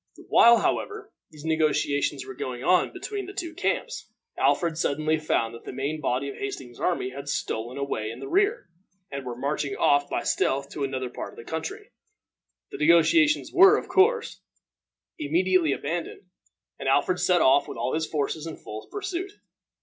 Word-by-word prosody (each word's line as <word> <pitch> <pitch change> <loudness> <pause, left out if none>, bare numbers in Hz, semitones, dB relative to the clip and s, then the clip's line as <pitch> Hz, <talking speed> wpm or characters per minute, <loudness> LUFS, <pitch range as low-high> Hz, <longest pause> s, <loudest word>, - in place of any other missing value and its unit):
While, 235 0 +7
however, 425 - -2 0.2
these 150 0 -13
negotiations 145 -3 +1
were 130 - -8
going 125 0 -5
on 180 +4 +3
between 400 -3 -5
the 395 - -9
two 340 -4 -4
camps, - - -2 0.3
Alfred 165 -2 +1
suddenly 155 +1 +1
found 115 -7 0
that 115 - -11
the - - -7
main 140 +4 -3
body 135 0 -1
of 140 - -7
Hastings's 130 -3 -6
army 170 -8 -1
had 140 +2 -7
stolen 120 0 -3
away 125 -6 -2
in 115 +2 -8
the 135 - -7
rear, 405 +5 +1 0.4
and 140 -1 -5
were 125 -2 -5
marching 140 +2 -2
off 145 0 +3
by - - -2
stealth 140 +1 0
to 145 - -4
another 130 -2 -3
part - - -7
of - - -18
the - - -9
country. 400 - -6 0.8
The - - -7
negotiations 170 - +4
were, 385 +4 +7
of - - -6
course, 455 +4 +2 0.8
immediately 170 +2 +2
abandoned, 165 +5 -4 0.6
and 135 - -1
Alfred 160 +7 +2
set 180 -2 +3
off 135 +2 +4
with - - -7
all 120 +3 -2
his 160 0 -1
forces 155 +1 -2
in 160 - -7
full 110 0 -9
pursuit. 380 -1 -4
150 Hz, 175 wpm, -26 LUFS, 135-190 Hz, 0.8 s, While